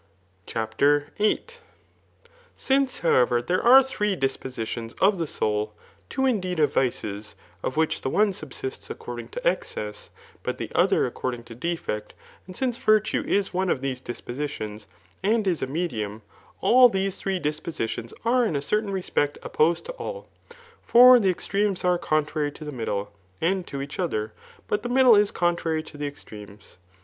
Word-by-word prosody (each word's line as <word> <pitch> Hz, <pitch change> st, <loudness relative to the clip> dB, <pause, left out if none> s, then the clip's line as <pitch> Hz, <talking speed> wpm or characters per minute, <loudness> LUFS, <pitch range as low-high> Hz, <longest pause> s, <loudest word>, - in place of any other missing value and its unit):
CHAPTER 140 Hz, +6 st, +1 dB
VIII, 210 Hz, +1 st, +2 dB, 1.1 s
Since, 270 Hz, -1 st, +1 dB
however, 125 Hz, -7 st, +3 dB
there 175 Hz, +10 st, 0 dB
are 260 Hz, +3 st, +8 dB
three 210 Hz, -6 st, -1 dB
dispositions 125 Hz, -5 st, -3 dB
of 195 Hz, -1 st, +3 dB
the 165 Hz, -, 0 dB
aoul, 105 Hz, -4 st, -1 dB, 0.4 s
two 265 Hz, 0 st, 0 dB
indeed 185 Hz, -8 st, 0 dB
of 150 Hz, -, +3 dB
vices, 105 Hz, -5 st, -2 dB, 0.3 s
of 130 Hz, -, -3 dB
which 160 Hz, 0 st, +1 dB
the 130 Hz, -, -2 dB
one 205 Hz, +6 st, +3 dB
subsists 135 Hz, -5 st, -7 dB
according 120 Hz, -1 st, -7 dB
to 120 Hz, -, -4 dB
excess, 105 Hz, -, -3 dB, 0.3 s
but -, -, -3 dB
the -, -, -5 dB
other -, -, +3 dB
according 120 Hz, -2 st, -4 dB
to 115 Hz, -, -11 dB
defect^ 125 Hz, -7 st, -3 dB, 0.3 s
and 185 Hz, -, -10 dB
since 250 Hz, -3 st, -1 dB
virtue 215 Hz, 0 st, +2 dB
Is 200 Hz, -1 st, +1 dB
one 185 Hz, +1 st, 0 dB
of 130 Hz, -, 0 dB
these 130 Hz, -2 st, -3 dB
dispositions, 120 Hz, -5 st, -6 dB, 0.3 s
and 215 Hz, +2 st, +2 dB
is 180 Hz, -4 st, 0 dB
a -, -, -1 dB
medium, 115 Hz, -, -3 dB, 0.4 s
all 250 Hz, +1 st, +7 dB
these 195 Hz, -2 st, -1 dB
three 190 Hz, -1 st, -1 dB
disposidons 150 Hz, -7 st, -3 dB
are 245 Hz, +2 st, +3 dB
in 195 Hz, -10 st, 0 dB
a 140 Hz, -, 0 dB
certain 210 Hz, +6 st, 0 dB
re« 190 Hz, -2 st, -2 dB
spect 145 Hz, -4 st, 0 dB
opposed 165 Hz, +2 st, +1 dB
to -, -, -5 dB
all. -, -, -7 dB, 0.5 s
For 250 Hz, +1 st, +8 dB
the 195 Hz, -4 st, +2 dB
extremes 195 Hz, +2 st, -1 dB
are 180 Hz, -1 st, +2 dB
contrary 155 Hz, -2 st, 0 dB
to 155 Hz, -, -10 dB
the 150 Hz, -, -5 dB
middle, 105 Hz, -5 st, -3 dB, 0.3 s
and 185 Hz, +2 st, 0 dB
to 140 Hz, 0 st, -4 dB
each 140 Hz, +5 st, -8 dB
other, 110 Hz, -12 st, -2 dB, 0.3 s
but 210 Hz, -, 0 dB
the 240 Hz, -, -4 dB
middle 250 Hz, -2 st, +6 dB
is 205 Hz, 0 st, +4 dB
contrary 170 Hz, -2 st, 0 dB
to 155 Hz, -, -13 dB
the 145 Hz, 0 st, -3 dB
extremes. 105 Hz, -9 st, -12 dB
160 Hz, 165 wpm, -25 LUFS, 120-200 Hz, 1.1 s, are